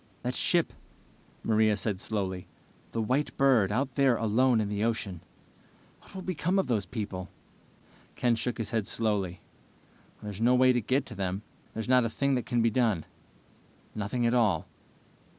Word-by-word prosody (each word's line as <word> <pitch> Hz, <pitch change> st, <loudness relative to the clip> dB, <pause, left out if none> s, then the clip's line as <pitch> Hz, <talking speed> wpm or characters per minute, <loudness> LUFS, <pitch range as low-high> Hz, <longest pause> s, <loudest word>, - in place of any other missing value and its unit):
"That 125 Hz, +1 st, -1 dB
ship 170 Hz, +5 st, +1 dB, 0.4 s
..." -, -, -31 dB
Maria 110 Hz, -1 st, +3 dB
said 100 Hz, -2 st, -2 dB
slowly. 95 Hz, -4 st, -3 dB, 0.4 s
"The 115 Hz, -, -1 dB
White 130 Hz, +6 st, 0 dB
Bird, 125 Hz, -8 st, +4 dB
out 130 Hz, +4 st, 0 dB
there 135 Hz, -2 st, +4 dB
alone 115 Hz, +2 st, +3 dB
in 105 Hz, -, 0 dB
the 105 Hz, +1 st, -2 dB
ocean 105 Hz, -6 st, -2 dB, 0.8 s
what -, -, -18 dB
will 190 Hz, -, -5 dB
become 180 Hz, +1 st, 0 dB
of 195 Hz, -, +2 dB
all 120 Hz, -, +1 dB
those 100 Hz, -4 st, -2 dB
people?" 95 Hz, -4 st, -5 dB, 0.9 s
Ken 120 Hz, -2 st, +2 dB
shook 120 Hz, +1 st, -2 dB
his 110 Hz, -2 st, -4 dB
head 110 Hz, -4 st, -1 dB
slowly. 100 Hz, -5 st, -1 dB, 0.8 s
"There's 105 Hz, 0 st, -6 dB
no 125 Hz, +2 st, +5 dB
way 130 Hz, 0 st, +5 dB
to 120 Hz, -, +1 dB
get 130 Hz, +5 st, 0 dB
to 125 Hz, -, -9 dB
them. 95 Hz, 0 st, -3 dB, 0.3 s
There's 110 Hz, +2 st, -3 dB
not 125 Hz, -1 st, +5 dB
a 115 Hz, -, 0 dB
thing 140 Hz, +4 st, 0 dB
that 125 Hz, -2 st, -1 dB
can 120 Hz, -2 st, +1 dB
be 115 Hz, -, +3 dB
done. 110 Hz, -8 st, +1 dB, 0.9 s
Nothing 110 Hz, +4 st, -2 dB
at 115 Hz, -, +2 dB
all." 100 Hz, -8 st, +2 dB
115 Hz, 175 wpm, -29 LUFS, 105-125 Hz, 0.9 s, no